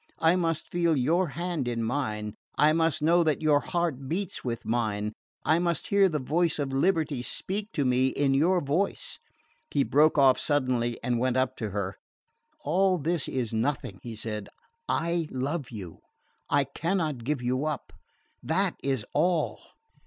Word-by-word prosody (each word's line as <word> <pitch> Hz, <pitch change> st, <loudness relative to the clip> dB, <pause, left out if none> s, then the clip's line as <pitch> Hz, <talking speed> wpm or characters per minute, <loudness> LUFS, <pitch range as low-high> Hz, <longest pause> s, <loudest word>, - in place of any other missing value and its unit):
I 165 Hz, +2 st, +4 dB
must 165 Hz, -3 st, -1 dB
feel 170 Hz, -3 st, +2 dB
your 165 Hz, +8 st, +2 dB
hand 170 Hz, -3 st, -3 dB
in 115 Hz, -1 st, -1 dB
mine, 110 Hz, -4 st, -2 dB, 0.2 s
I 150 Hz, +1 st, +5 dB
must 165 Hz, -2 st, +1 dB
know 170 Hz, +2 st, +5 dB
that 155 Hz, -1 st, 0 dB
your 150 Hz, -2 st, +5 dB
heart 150 Hz, -6 st, -2 dB
beats 185 Hz, +2 st, -2 dB
with 115 Hz, -2 st, -4 dB
mine, 110 Hz, -2 st, -1 dB, 0.3 s
I 160 Hz, +2 st, +4 dB
must 170 Hz, -1 st, -1 dB
hear 200 Hz, -1 st, +5 dB
the 155 Hz, -, -1 dB
voice 160 Hz, +5 st, +1 dB
of 140 Hz, -2 st, -2 dB
liberty 150 Hz, -2 st, +1 dB
speak 200 Hz, -, -2 dB
to 145 Hz, -, 0 dB
me 125 Hz, +1 st, +3 dB
in 135 Hz, +1 st, +1 dB
your 175 Hz, +6 st, +3 dB
voice 155 Hz, +8 st, -1 dB, 0.3 s
" 310 Hz, -, -40 dB
He 140 Hz, -, +4 dB
broke 150 Hz, +3 st, +4 dB
off 135 Hz, -2 st, +5 dB
suddenly 125 Hz, -5 st, 0 dB
and 120 Hz, -1 st, 0 dB
went 130 Hz, +1 st, +1 dB
up 130 Hz, 0 st, +1 dB
to 110 Hz, -, -3 dB
her. 100 Hz, -2 st, -3 dB, 0.6 s
"All 185 Hz, +5 st, +2 dB
this 165 Hz, 0 st, 0 dB
is 120 Hz, -4 st, -2 dB
nothing," 110 Hz, -4 st, -1 dB
he 115 Hz, -2 st, -7 dB
said. 105 Hz, -1 st, -5 dB, 0.4 s
"I 170 Hz, 0 st, 0 dB
love 135 Hz, +2 st, -3 dB
you. 95 Hz, -8 st, -8 dB, 0.5 s
I 145 Hz, -, +3 dB
cannot 155 Hz, -1 st, -2 dB
give 135 Hz, 0 st, -1 dB
you 130 Hz, +4 st, 0 dB
up. 150 Hz, -2 st, -4 dB, 0.5 s
That 185 Hz, +3 st, 0 dB
is 135 Hz, -6 st, -1 dB
all." 170 Hz, +2 st, +1 dB
145 Hz, 165 wpm, -28 LUFS, 125-170 Hz, 0.6 s, I